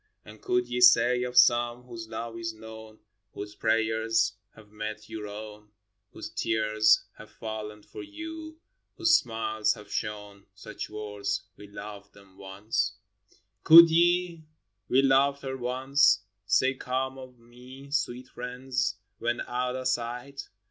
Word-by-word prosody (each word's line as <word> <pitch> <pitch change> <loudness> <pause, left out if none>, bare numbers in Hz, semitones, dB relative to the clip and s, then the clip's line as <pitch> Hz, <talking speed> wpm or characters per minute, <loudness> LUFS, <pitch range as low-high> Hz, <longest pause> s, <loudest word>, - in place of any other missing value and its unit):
And 110 0 -13
could 125 0 0
ye 125 0 -3
say 125 0 +6
of 125 0 -3
some, 120 0 +4
whose 115 -2 -9
love 115 +1 -6
is 115 -1 -5
known, 110 0 -12 0.3
Whose 105 0 -7
prayers 110 0 +1 0.2
have 105 -2 -17
met 105 0 -6
your 105 -1 -6
own, 105 0 -9 0.4
Whose - - -8
tears 110 0 +2 0.2
have - - -12
fallen 105 -1 -7
for - - -10
you, 315 0 -8 0.4
whose 335 -2 +3
smiles 110 - +1
have 105 -1 -14
shone, 105 -1 -5
Such 105 +2 -8
words, 105 -1 -4
"We 105 - -13
loved 100 0 -10
them 100 -1 -19
once" 105 +2 -2 0.4
f - - -28 0.3
Could 165 +1 +10
ye, 175 0 +2 0.2
" 95 +1 -52
We 135 +2 +4
loved 140 +1 +3
her 130 -1 -4
once," 130 +1 +2 0.2
Say 130 +6 +3
calm 130 +1 -3
of 130 -1 -12
me, 125 +4 -14
sweet 125 -3 -2
friends, 125 -2 -3 0.2
when 120 0 -1
out 125 +1 -2
of 130 0 -3
sight? 125 +3 -4
115 Hz, 145 wpm, -28 LUFS, 105-130 Hz, 0.4 s, Could